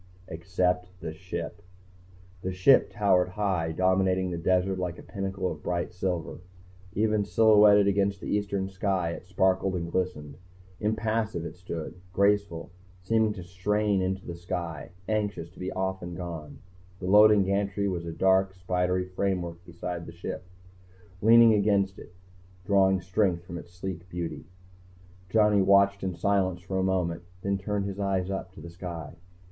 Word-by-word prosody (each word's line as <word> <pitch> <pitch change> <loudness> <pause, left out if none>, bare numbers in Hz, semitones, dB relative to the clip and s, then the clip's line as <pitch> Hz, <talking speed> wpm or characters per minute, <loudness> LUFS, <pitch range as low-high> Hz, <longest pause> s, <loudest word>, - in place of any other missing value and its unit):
Except 90 +2 0
the 80 -3 -5
Ship. 85 -1 -6 0.8
The 95 - -3
Ship 95 +9 +5
towered 95 -3 +2
high, 95 -5 -1
dominating 95 +1 +2
the 85 - -3
desert 95 +2 +1
like 90 -1 -3
a - - -11
pinnacle 95 -2 -3
of 75 -2 -8
bright 85 +1 -2
silver. 90 -3 -3 0.5
Even 105 0 +1
silhouetted 105 +1 +6
against 100 0 +1
the - - -9
eastern 100 -2 -1
sky, 95 -3 -1
it 90 - -8
sparkled 95 0 +1
and 85 -1 -3
glistened. 75 -6 -3 0.4
Impassive 110 -4 -1
it - - -7
stood, 90 -1 -7
graceful, 100 -5 +1 0.3
seeming 110 +2 +2
to 95 -4 -8
strain 100 +3 0
into 95 0 -2
the 85 - -5
sky, 85 -1 -5 0.2
anxious 100 -6 -2
to 90 - -17
be 90 +1 -3
off 95 0 -2
and 85 0 -6
gone. 85 -4 -7 0.4
The 90 - -6
loading 105 +1 +7
gantry 100 +1 0
was 85 -3 -3
a - - -3
dark, 95 +2 +2
spidery 90 0 0
framework 90 -2 -2
beside 85 0 -5
The 85 - -9
Ship, 85 - -6 0.8
leaning 115 +1 +7
against 100 -2 +2
it, 90 - -13 0.5
drawing 95 -2 +3
strength 95 -1 0
from 85 -1 -6
its 85 - -13
sleek 90 0 -7
beauty. 85 -2 -5 0.8
Johnny 105 -1 +4
watched 100 +1 +4
it 95 - -2
in 90 - -3
silence 95 0 +1
for 95 0 -2
a - - +1
moment, 90 -3 0 0.2
then 100 0 0
turned 100 +1 -2
his 100 0 -5
eyes 95 -1 0
up, 95 -1 -4
to - - -12
the 85 - -9
sky. 85 -4 -7
95 Hz, 160 wpm, -28 LUFS, 90-100 Hz, 0.8 s, loading